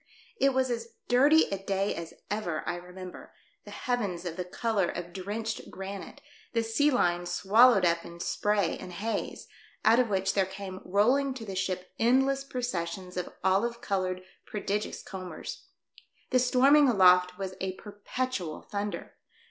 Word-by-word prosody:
It 275 -1 +3
was 260 -1 +2
as 230 -1 -4
dirty 285 +6 +6
a 195 -1 -3
day 195 0 0
as 165 -1 -7 0.2
ever 180 -7 -2
I - - 0
remember 180 +1 -10
— - - -38
the - - -10
heavens 200 -8 -2
of 170 -2 -4
the 180 - -3
colour 200 +1 0
of 175 0 -6
drenched 210 +4 -4
granite, 195 +1 -7 0.3
the 230 -1 +2
sea 225 +7 +2
line 175 -9 +1
swallowed 215 +1 +5
up 170 0 +2
in 170 0 -10
spray 205 0 0
and 180 -1 -8
haze, 220 +5 -3 0.4
out 230 +2 +6
of 245 -3 +2
which 195 -1 +1
there 195 -2 +2
came 190 -1 -7
rolling 255 +8 +2
to 230 -4 -7
the 195 - -5
ship 185 -1 -2
endless 270 +4 +3
processions 190 -8 -4
of 180 -1 -3
olive 210 +6 +2
coloured, 185 -3 -2 0.2
prodigious 210 0 -3
combers. 185 -4 -7 0.6
The 255 - +5
storming 270 +3 +5
aloft 180 -4 +5
was 190 -1 -4
a 190 0 -1
perpetual 205 -3 -4
thunder. 205 0 -5
200 Hz, 155 wpm, -29 LUFS, 185-235 Hz, 0.6 s, dirty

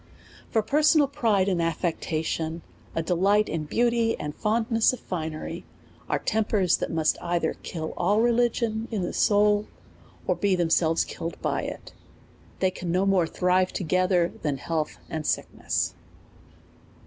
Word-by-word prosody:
For 220 - +1
personal 300 +3 +4
pride 225 -9 +1
and 180 -3 +1
affectation, 165 -1 -2 0.3
a 165 - 0
delig 195 +5 +3
ht - - -9
in 160 -2 -2
beauty 235 +5 +1
and 150 0 -4
fondness 225 +3 +2
of 255 - -6
finery, 160 -3 -5 0.5
are - - +2
tempers 210 -5 +1
that - - -3
must 160 -2 +1
either 170 -2 0
kill 160 -2 -5
all 205 +4 +2
religion 230 -1 +1
in 210 -5 -2
the 175 - -3
soul, 210 0 +3 0.6
or - - +2
be 200 -2 +1
themselves 165 -1 +2
killed 165 +1 -6
by - - 0
it; - - -7 0.7
they 190 -1 +3
can 180 -2 -5
no 185 +3 +2
more 190 -4 +3
thrive 180 +2 +1
together 180 0 +1
than 145 -3 -1
health 155 +1 -3
and 155 -2 -4
sickness. - - -1
185 Hz, 145 wpm, -26 LUFS, 165-220 Hz, 0.7 s, personal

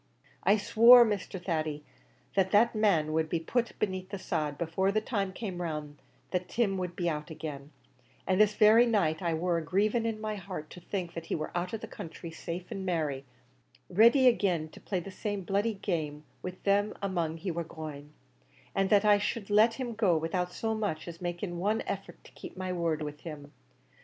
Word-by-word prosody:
I 205 - +5
swore, 235 +3 +8
Mr. 205 -3 -3
Thady, 155 -4 -2 0.5
that 190 -1 +2
that 215 +4 +4
man 175 -8 +2
should 160 0 +1
be 170 - 0
put 235 +8 -1
beneath 185 -2 -2
the 200 - -4
sod 155 -6 -2
before 175 +4 0
the 215 - +2
time 205 -4 -2
came 185 -3 -5
round 150 -3 -5 0.3
that 180 -1 -2
Tim 200 -5 0
should 180 -1 -4
be 175 - -1
out 150 -1 -2
agin; 150 -3 -7 0.5
an' 185 +1 +1
this 210 0 +4
very 225 +3 +6
night 185 -8 +1
I 170 -2 0
war 170 +1 0
a - - -6
grieving 210 +7 +1
in 220 -1 -3
my 215 -1 -3
heart 180 -5 -7
to - - -10
think 175 -1 -4
that 165 -1 -7
he - - -1
war 155 -1 -4
out 175 +1 -2
of 225 - -3
the - - -6
country 165 0 -8
safe 170 +2 -6
an' 195 - -4
merry 155 -7 -1 0.7
ready 235 +7 +6
agin 180 -9 +2
to - - -14
play 190 - -2
the 195 - -8
same 205 0 -3
bloody 205 +4 0
game 155 -6 -3 0.2
with 185 0 -7
them 205 +1 +2
among 170 -5 -1
he 180 +2 -3
war 170 +1 -2
going; 150 -3 -8 0.6
an' 195 0 +2
that 205 0 +4
I 205 -1 +6
should 205 0 -3
let 220 +3 +5
him 250 -3 -4
go 205 -7 +3
without 180 +3 -1
so 220 +3 -2
much 205 -8 -2
as 170 0 -8
making 175 0 -4
one 210 +5 0
effort 195 0 -6
to - - -16
keep - - -11
my 185 -1 -3
word 165 -3 -1
with 150 0 -6
him! 145 -3 -9
185 Hz, 200 wpm, -30 LUFS, 160-205 Hz, 0.7 s, swore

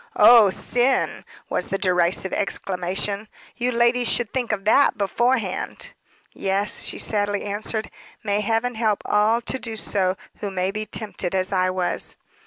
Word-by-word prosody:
"Oh 230 -4 +8
sin!" 245 +7 0 0.2
was - - -2
the 195 - -1
derisive 180 0 +1
exclamation. 195 +2 -2 0.3
"You 245 +1 -1
ladies 240 0 +2
should 235 -2 +1
think 250 -3 -1
of 200 -2 -3
that 280 +6 +4
beforehand." 235 +6 -1 0.4
"Yes," 195 +2 -1
she - - -3
sadly 205 -1 0
answered. 215 +2 -3 0.3
"May 205 -1 0
heaven 225 +3 0
help 220 -2 0
all 215 +3 +2
to 260 +3 -3
do 225 -3 -5
so 190 -3 0 0.2
who 205 - -3
may 185 0 -1
be 215 +1 -5
tempted 200 -4 -3
as 185 +1 +1
I 185 -1 +2
was." 185 -1 -2
210 Hz, 150 wpm, -23 LUFS, 190-230 Hz, 0.4 s, Oh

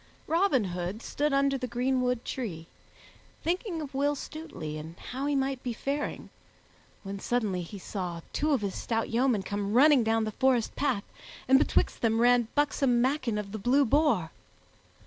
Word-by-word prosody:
Robin 330 - +2
Hood 180 +3 -4
stood 295 +1 -1
under 275 0 +2
the 250 - -3
greenwood 250 0 0
tree, 180 -11 -4 0.8
thinking 345 -1 -1
of 280 - -9
Will 285 +2 +1
Stutely 270 - -7
and 160 +3 -9
how 265 +3 -5
he 290 - +1
might 270 -1 -1
be 245 - -3
faring, 280 +5 -3 0.7
when 195 0 -5
suddenly 210 -6 -1
he 175 +4 -8
saw 180 -3 -5
two 305 - 0
of 275 -6 +2
his 200 -2 -2
stout 225 -1 -2
yeomen 235 -3 +2
come 205 +1 -3
running 280 -1 +6
down 225 0 +2
the 215 - -2
forest 250 0 +1
path, 265 -8 0 0.4
and 265 +1 +6
betwixt - - +1
them 225 -1 +2
ran 240 -1 +4
buxom 275 -4 +2
Maken 250 -4 +1
of 200 -1 -6
the 215 - -5
Blue 265 +7 +3
Boar. 250 - +2
245 Hz, 165 wpm, -29 LUFS, 210-275 Hz, 0.8 s, running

